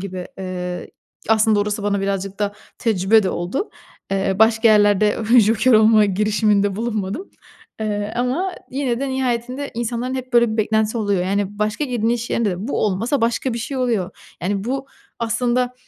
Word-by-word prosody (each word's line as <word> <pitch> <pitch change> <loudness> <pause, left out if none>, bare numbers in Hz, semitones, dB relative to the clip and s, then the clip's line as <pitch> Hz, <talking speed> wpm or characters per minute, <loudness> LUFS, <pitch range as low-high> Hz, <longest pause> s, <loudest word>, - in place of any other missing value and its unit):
gibi. 185 -2 -6
Eee, 180 -1 -5 0.4
aslında 220 -1 +4
orası 210 0 -2
bana 200 -1 0
birazcık 195 0 -3
da 205 -1 -1 0.3
tecrübe 215 0 +3
de 185 - 0
oldu. 180 - -3 0.4
Eee, 195 -1 0
başka 225 +1 +4
yerlerde 210 -1 +4 0.2
joker 220 +4 +3
olma 215 0 +6
girişiminde 205 0 +1
bulunmadım, 220 - -3 0.5
eee, 210 0 -2
ama 280 +10 0 0.2
yine 260 -2 -1
de 275 - -1
nihayetinde 255 +1 -2
insanların 240 +2 -2
hep, 255 -1 -6
böyle, 235 -2 +4
bir - - -3
beklentisi 220 +1 +1
oluyor. 200 -4 0
Yani, 200 +1 -2
başka 215 +7 -1
girdiğin 235 -3 -1
iş 240 0 -3
yerinde 225 -3 +1
de 190 +7 -5
bu - - -1
olmasa 230 +8 0
başka 235 +2 0
bir - - -3
şey 270 +4 -4
oluyor. 235 -8 0 0.3
Yani, 195 +2 -1
bu 270 +2 -3 0.3
aslında, 245 +2 0
220 Hz, 165 wpm, -20 LUFS, 200-240 Hz, 0.5 s, olma